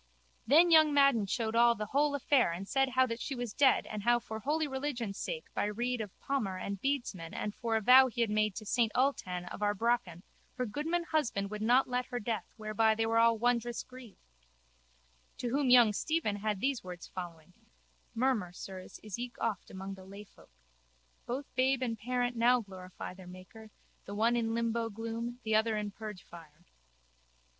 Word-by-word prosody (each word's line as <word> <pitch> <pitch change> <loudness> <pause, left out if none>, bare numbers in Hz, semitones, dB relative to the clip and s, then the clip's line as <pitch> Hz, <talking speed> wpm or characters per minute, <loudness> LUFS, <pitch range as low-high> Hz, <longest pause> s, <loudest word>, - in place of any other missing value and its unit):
Then 335 +5 +6
young 315 -2 +7
Madden 275 -7 +4
showed 225 +1 -2
all 235 0 +5
the 210 -1 -4
whole 285 +5 +1
affair 270 -7 +2
and 185 +4 -6
said 270 +2 +1
how 260 0 +3
that 230 -2 -4
she 275 - -4
was 245 -4 -4
dead 280 -2 +4
and 210 -1 -5
how 240 +3 +4
for 220 -2 -6
holy 300 +7 0
religion 265 -6 -3
sake 480 - -5
by - - 0
rede 240 +3 -2
of 205 -4 -8
palmer 220 -9 -2
and 200 +1 -5
bedesman 240 -12 -2
and 210 - -3
for 230 0 -2
a 220 - +1
vow 255 +4 +8
he 240 -1 -3
had 225 -2 +1
made 215 -2 +1
to 215 - -7
Saint 225 +1 +1
Ultan 185 -9 0
of - - -8
Arbraccan 205 -4 0 0.3
her 250 - -1
goodman 310 +9 -2
husband 230 -12 -1
would 210 0 -5
not 245 +4 +4
let 250 0 -2
her 245 - -4
death 220 -3 -4
whereby 220 0 +1
they 225 +1 0
were 225 0 +2
all 230 0 +4
wondrous 240 0 0
grieved. 250 -5 -13 1.2
To 245 - -3
whom 275 +1 +1
young 240 -4 +7
Stephen 295 -5 -1
had 210 -1 -2
these 270 0 0
words 180 -1 -8
following: 175 -2 -9 0.6
Murmur, 225 -7 +1
sirs, 185 0 -9
is 210 0 -6
eke 245 0 -6
oft 220 -5 -2
among 190 +1 -7
lay 195 +2 -11
folk. 200 - -21 0.8
Both 265 +4 -5
babe 260 0 +2
and 230 -2 -1
parent 245 +2 -2
now 240 +2 +4
glorify 185 -3 -9
their 185 -1 -13
Maker, 185 +5 -12 0.4
the 200 - -7
one 230 +3 +2
in 225 -1 0
limbo 230 0 -1
gloom, 230 +3 -5
the 220 0 -1
other 220 0 +2
in 210 -1 -3
purgefire. 175 -6 -11
230 Hz, 185 wpm, -32 LUFS, 205-250 Hz, 1.2 s, vow